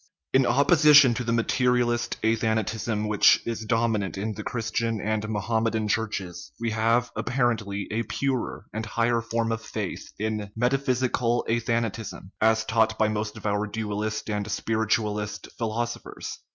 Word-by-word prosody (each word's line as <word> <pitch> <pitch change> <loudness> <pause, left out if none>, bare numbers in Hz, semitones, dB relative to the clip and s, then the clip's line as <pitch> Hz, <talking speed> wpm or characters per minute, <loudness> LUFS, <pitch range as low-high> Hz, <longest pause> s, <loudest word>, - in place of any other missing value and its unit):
In 130 -1 +4
opposition 145 0 +6
to 125 +2 -3
the 115 - -1
materialist 120 0 +1
athanatism, 110 -1 0
which 105 -1 +5
is 115 -2 -3
dominant 110 -4 0
in 105 +3 -2
the - - -6
Christian 115 -1 -2
and 105 +1 -2
Mohammedan 110 +1 0
Churches, 105 -5 -3
we 115 -1 -1
have, 115 +2 +1
apparently, 115 -6 -1
a 110 +2 0
purer 130 +3 -2
and 110 +1 -3
higher 115 +2 +1
form 115 0 -1
of 115 0 -2
faith - - -5
in 110 +1 -1
the 105 -1 -7
metaphysical 125 -1 +1
athanatism, 115 -1 -1 0.2
as 110 0 +3
taught 110 0 +2
by 110 -1 +2
most 105 0 -3
of - - -11
our 105 0 0
dualist 110 0 -3
and 105 -1 -2
spiritualist 105 -1 -1
philosophers. 115 +1 -4
110 Hz, 140 wpm, -26 LUFS, 110-120 Hz, 0.2 s, opposition